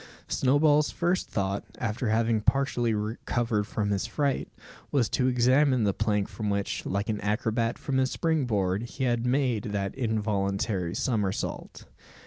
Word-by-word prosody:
Snowball's 145 Hz, +3 st, +3 dB
first 175 Hz, +2 st, -1 dB
thought, 100 Hz, 0 st, -1 dB
after 115 Hz, 0 st, -2 dB
having 110 Hz, 0 st, +2 dB
partially 120 Hz, -2 st, +1 dB
recovered 110 Hz, 0 st, -1 dB
from 105 Hz, -1 st, -1 dB
his 100 Hz, +2 st, -1 dB
fright, 140 Hz, +3 st, -1 dB, 0.4 s
was 130 Hz, -6 st, +2 dB
to 130 Hz, -, +1 dB
examine 130 Hz, +1 st, +3 dB
the 100 Hz, -2 st, +2 dB
plank 105 Hz, -2 st, 0 dB
from 105 Hz, -2 st, -4 dB
which, 100 Hz, 0 st, -1 dB
like 100 Hz, +2 st, -1 dB
an 105 Hz, -2 st, -2 dB
acrobat 115 Hz, +2 st, 0 dB
from 135 Hz, -2 st, -2 dB
his 130 Hz, 0 st, +2 dB
spring 160 Hz, -3 st, 0 dB
board, 95 Hz, -3 st, 0 dB
he 120 Hz, +3 st, -5 dB
had 120 Hz, -1 st, +1 dB
made 125 Hz, -5 st, +1 dB
that 100 Hz, -2 st, -2 dB
involuntary 100 Hz, -6 st, -1 dB
somersault. 105 Hz, -6 st, -2 dB
115 Hz, 145 wpm, -27 LUFS, 105-130 Hz, 0.4 s, Snowball's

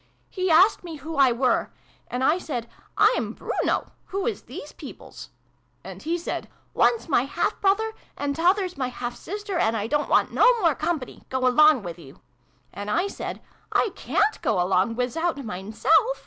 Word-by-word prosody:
" -, -, -40 dB
He 370 Hz, -1 st, -1 dB
asked 360 Hz, +6 st, +5 dB
me 335 Hz, -2 st, -7 dB
who 310 Hz, +3 st, -7 dB
I 270 Hz, -3 st, +5 dB
were. 250 Hz, +2 st, +1 dB, 0.4 s
And 250 Hz, +1 st, -3 dB
I 310 Hz, +6 st, +3 dB
said 245 Hz, -9 st, -4 dB, 0.2 s
' -, -, -34 dB, 0.2 s
I'm -, -, -2 dB
Bruno: -, -, -2 dB
who 390 Hz, 0 st, -3 dB
is 455 Hz, -4 st, -2 dB
these -, -, -9 dB
peoples? -, -, -11 dB, 0.3 s
' -, -, -42 dB
And -, -, -9 dB
he 335 Hz, +2 st, -1 dB
said 345 Hz, -, -5 dB
' -, -, -39 dB
One's 465 Hz, -, +2 dB
my 265 Hz, -5 st, +2 dB
half 275 Hz, -, -2 dB
brother, 435 Hz, +3 st, +2 dB, 0.2 s
and 285 Hz, 0 st, -2 dB
t'other's 365 Hz, +2 st, +2 dB
my 255 Hz, -, 0 dB
half 245 Hz, -1 st, -5 dB
sister: 405 Hz, -1 st, -4 dB
and 225 Hz, -5 st, +2 dB
I 205 Hz, -, -2 dB
don't 295 Hz, +5 st, 0 dB
want -, -, +3 dB
no -, -, +5 dB
more 335 Hz, -6 st, +3 dB
company! 310 Hz, -4 st, -3 dB
Go 260 Hz, 0 st, -1 dB
along 300 Hz, -1 st, +5 dB
with 175 Hz, -1 st, -7 dB
yer! 135 Hz, -4 st, -13 dB, 0.3 s
' 125 Hz, 0 st, -39 dB
And 205 Hz, +1 st, -6 dB
I 345 Hz, -, +1 dB
said 400 Hz, -, -6 dB, 0.3 s
'I 450 Hz, -, +3 dB
ca'n't 425 Hz, +1 st, 0 dB
go 225 Hz, -, +1 dB
along 185 Hz, +5 st, +2 dB
wizout 275 Hz, +7 st, -1 dB
mine 195 Hz, 0 st, -6 dB
self!' 220 Hz, -, +3 dB
295 Hz, 195 wpm, -25 LUFS, 235-360 Hz, 0.4 s, asked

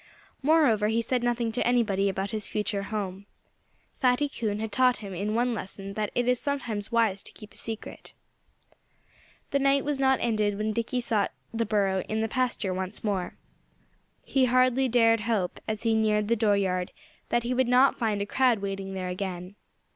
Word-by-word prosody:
Moreover 275 Hz, -8 st, +4 dB
he 225 Hz, +2 st, +1 dB
said 250 Hz, +2 st, 0 dB
nothing 240 Hz, -1 st, 0 dB
to 245 Hz, -, -1 dB
anybody 205 Hz, -5 st, +2 dB
about 195 Hz, +1 st, -3 dB
his 215 Hz, -2 st, -3 dB
future 210 Hz, -1 st, -1 dB
home. 200 Hz, -1 st, -5 dB, 0.7 s
Fatty 255 Hz, +2 st, +3 dB
Coon 220 Hz, -7 st, -3 dB
had 220 Hz, 0 st, -4 dB
taught 255 Hz, 0 st, +3 dB
him 200 Hz, -3 st, -8 dB
in 205 Hz, +4 st, -2 dB
one 240 Hz, +1 st, +1 dB
lesson 195 Hz, -2 st, -6 dB
that 210 Hz, 0 st, -2 dB
it 245 Hz, 0 st, +1 dB
is 250 Hz, -1 st, +3 dB
sometimes 235 Hz, -8 st, -3 dB
wise 225 Hz, -4 st, +2 dB
to -, -, -9 dB
keep 210 Hz, -1 st, -13 dB
a -, -, -19 dB
secret. 225 Hz, -1 st, -7 dB, 1.4 s
The 280 Hz, -, +2 dB
night 275 Hz, 0 st, +3 dB
was 290 Hz, -2 st, -1 dB
not 265 Hz, -1 st, +4 dB
ended 215 Hz, -3 st, 0 dB
when 215 Hz, +1 st, -1 dB
Dickie 235 Hz, +3 st, -1 dB
sought 220 Hz, -4 st, 0 dB, 0.2 s
the 230 Hz, -1 st, -1 dB
burrow 195 Hz, -3 st, +1 dB
in 220 Hz, 0 st, 0 dB
the 225 Hz, -, 0 dB
pasture 240 Hz, -6 st, -1 dB
once 190 Hz, +2 st, -4 dB
more. 195 Hz, -4 st, -2 dB, 0.9 s
He 265 Hz, -2 st, +2 dB
hardly 255 Hz, +1 st, +3 dB
dared 230 Hz, -1 st, +4 dB
hope, 210 Hz, -4 st, -1 dB
as 215 Hz, -1 st, -3 dB
he 225 Hz, -1 st, +2 dB
neared 215 Hz, -1 st, +2 dB
the 235 Hz, -, +4 dB
dooryard, 200 Hz, -5 st, +1 dB, 0.4 s
that 240 Hz, -1 st, +1 dB
he 245 Hz, +2 st, -1 dB
would 255 Hz, 0 st, +2 dB
not 250 Hz, +2 st, +4 dB
find 210 Hz, -3 st, 0 dB
a -, -, -4 dB
crowd 250 Hz, +2 st, +3 dB
waiting 195 Hz, -1 st, -4 dB
there 185 Hz, -1 st, -3 dB
again. 180 Hz, 0 st, -5 dB
220 Hz, 185 wpm, -27 LUFS, 200-245 Hz, 1.4 s, Moreover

